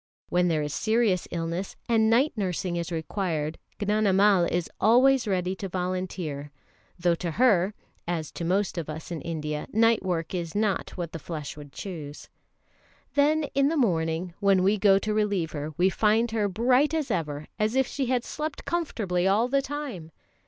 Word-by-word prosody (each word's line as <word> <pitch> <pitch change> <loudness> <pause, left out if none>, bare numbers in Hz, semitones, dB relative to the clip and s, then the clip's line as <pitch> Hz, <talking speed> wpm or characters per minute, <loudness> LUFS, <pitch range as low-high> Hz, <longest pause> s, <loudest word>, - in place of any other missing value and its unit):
When 180 0 +2
there 155 -3 +1
is 150 0 -4
serious 220 -4 +1
illness, 170 +3 -3
and 220 -2 +3
night 255 +7 +3
nursing 185 -3 -2
is 170 0 -3
required, 160 -2 -2 0.2
Gnanamal 205 -2 +3
is 175 -2 0
always 255 +2 +5
ready 185 -1 0
to 195 - -5
volunteer; 180 -5 -3 0.5
though 175 -1 +2
to 170 +1 -3
her, 205 -1 +3 0.3
as 165 -3 -2
to - - -6
most 185 +1 0
of 155 - -6
us 160 +3 -7
in 165 - -4
India, 150 -2 -4
night 225 +1 +4
work 175 -2 -2
is 170 -2 -4
not 205 -2 -1
what 170 -2 -4
the 165 - -6
flesh 150 -2 -6
would 145 -2 -11
choose. 155 -4 -8 0.8
Then 300 +2 +3
in 275 0 +3
the 325 - 0
morning, 170 - 0
when 195 -2 +3
we 200 +2 +3
go 195 -1 +6
to 210 +2 -1
relieve 205 -6 0
her, 150 0 -4
we 185 +2 +3
find 220 +3 +2
her 215 -2 +1
bright 250 - +2
as 310 -4 -1
ever, 150 -3 -2
as 215 +3 +1
if 265 0 +3
she 270 0 -3
had 250 -1 +1
slept 300 +2 -5
comfortably 205 - -1
all 210 +5 +3
the 275 +2 +2
time. 265 - -5
190 Hz, 175 wpm, -27 LUFS, 170-225 Hz, 0.8 s, go